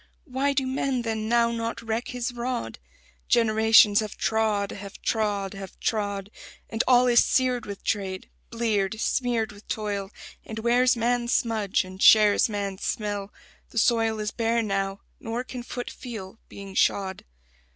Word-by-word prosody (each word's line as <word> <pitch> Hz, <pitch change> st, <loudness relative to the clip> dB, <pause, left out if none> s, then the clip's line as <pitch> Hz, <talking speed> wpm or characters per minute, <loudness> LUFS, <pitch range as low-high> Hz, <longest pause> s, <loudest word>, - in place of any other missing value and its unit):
Why 275 Hz, 0 st, 0 dB
do 270 Hz, -1 st, 0 dB
men 260 Hz, -1 st, -1 dB
then 220 Hz, -1 st, -2 dB
now 235 Hz, 0 st, +3 dB
not 230 Hz, 0 st, -3 dB
reck 225 Hz, +1 st, -2 dB
his 245 Hz, -1 st, -3 dB
rod? 245 Hz, 0 st, -4 dB, 0.5 s
Generations 220 Hz, -2 st, +5 dB
have 215 Hz, -2 st, -4 dB
trod, 215 Hz, -2 st, 0 dB
have 200 Hz, 0 st, -9 dB
trod, 205 Hz, -3 st, -1 dB
have 195 Hz, -1 st, -9 dB
trod; 205 Hz, -2 st, -2 dB, 0.4 s
And 225 Hz, +1 st, 0 dB
all 250 Hz, -1 st, +6 dB
is 240 Hz, -1 st, +5 dB
seared 250 Hz, -2 st, +1 dB
with 200 Hz, -1 st, -7 dB
trade; 190 Hz, -3 st, -2 dB, 0.2 s
bleared, 220 Hz, -3 st, -1 dB
smeared 235 Hz, -2 st, 0 dB
with 205 Hz, 0 st, -16 dB
toil; 205 Hz, -2 st, -3 dB, 0.3 s
And 220 Hz, -, -8 dB
wears 240 Hz, +2 st, +3 dB
man's 240 Hz, +1 st, 0 dB
smudge 220 Hz, -4 st, +1 dB
and 185 Hz, +1 st, -11 dB
shares 215 Hz, 0 st, +6 dB
man's 200 Hz, -2 st, -4 dB
smell: 205 Hz, -2 st, -3 dB, 0.4 s
the -, -, -10 dB
soil 225 Hz, -1 st, +2 dB
Is 210 Hz, 0 st, -2 dB
bare 230 Hz, 0 st, 0 dB
now, 195 Hz, -1 st, -2 dB, 0.2 s
nor 230 Hz, +2 st, -4 dB
can 255 Hz, -1 st, -7 dB
foot 245 Hz, 0 st, -6 dB
feel, 225 Hz, -4 st, -8 dB
being 195 Hz, -1 st, -9 dB
shod. 190 Hz, 0 st, +1 dB
220 Hz, 150 wpm, -26 LUFS, 205-240 Hz, 0.5 s, all